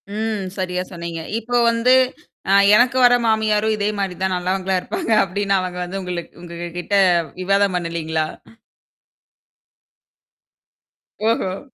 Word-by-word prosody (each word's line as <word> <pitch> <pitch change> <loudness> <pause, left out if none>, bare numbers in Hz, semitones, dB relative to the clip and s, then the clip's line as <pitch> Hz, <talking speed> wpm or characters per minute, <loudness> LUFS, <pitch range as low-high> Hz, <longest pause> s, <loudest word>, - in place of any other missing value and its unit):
ம். 215 -3 -2
சரியா 180 -1 -2
சொன்னீங்க. 170 -1 -6 0.2
இப்ப 240 +1 0
வந்து, 230 +2 +3 0.6
அ - - +3 0.2
எனக்கு 245 +2 +3
வர்ற 245 0 +6
மாமியாரும் 220 0 +1
இதே 205 0 0
மாரிதான் 190 -1 -2
நல்லவங்களா 185 +1 -1
இருப்பாங்க 350 -9 -4
அப்படின்னு 195 +1 -1
அவங்க 180 -1 -5
வந்து 195 +2 -5
உங்களுக்கு 175 -2 -6
உங்ககிட்ட 175 +3 -5 0.5
விவாதம் 195 0 +2
பண்ணலீங்களா? 160 -2 -2 3.0
ஓஹோ. 195 -4 0
190 Hz, 105 wpm, -20 LUFS, 180-220 Hz, 3.0 s, வர்ற